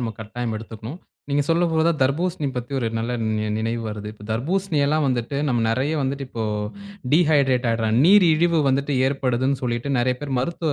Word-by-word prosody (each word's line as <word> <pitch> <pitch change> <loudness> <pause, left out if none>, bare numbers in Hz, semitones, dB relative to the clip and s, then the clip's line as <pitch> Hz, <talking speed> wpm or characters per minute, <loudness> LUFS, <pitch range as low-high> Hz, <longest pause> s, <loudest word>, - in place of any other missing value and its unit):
நம்ம 115 -2 -2
கட்டாயம் 115 +1 -4
எடுத்துக்கணும். 115 - -8 0.3
நீங்க 145 +1 +2
சொல்லப் 170 +1 +2
போதுதான் 160 0 +2
தர்பூசணி 155 +4 0
பத்தி 120 +2 -5
ஒரு 120 - -1
நல்ல 115 +2 -2 0.5
நினைவு 115 +1 -2
வருது. 105 0 -6
இப்ப 105 -1 -14
தர்பூசணி 165 - -1
எல்லாம் 155 +1 +1
வந்துட்டு 125 +2 -2
நம்ம 120 -2 +1
நெறைய 130 +7 0
வந்துட்டு 135 0 -2
இப்போ 115 -3 -4 0.7
டீஹைட்ரேட் 140 -6 +3
ஆயிடுறோம். 115 0 +1
நீரிழிவு 170 -3 +5
வந்துட்டு 140 +2 0
ஏற்படுதுன்னு 130 0 0
சொல்லிட்டு 120 +2 -2
நெறைய 125 +1 +2
பேர் 135 -3 -2
மருத்துவ 160 +3 -1
135 Hz, 160 wpm, -22 LUFS, 120-155 Hz, 0.7 s, நீரிழிவு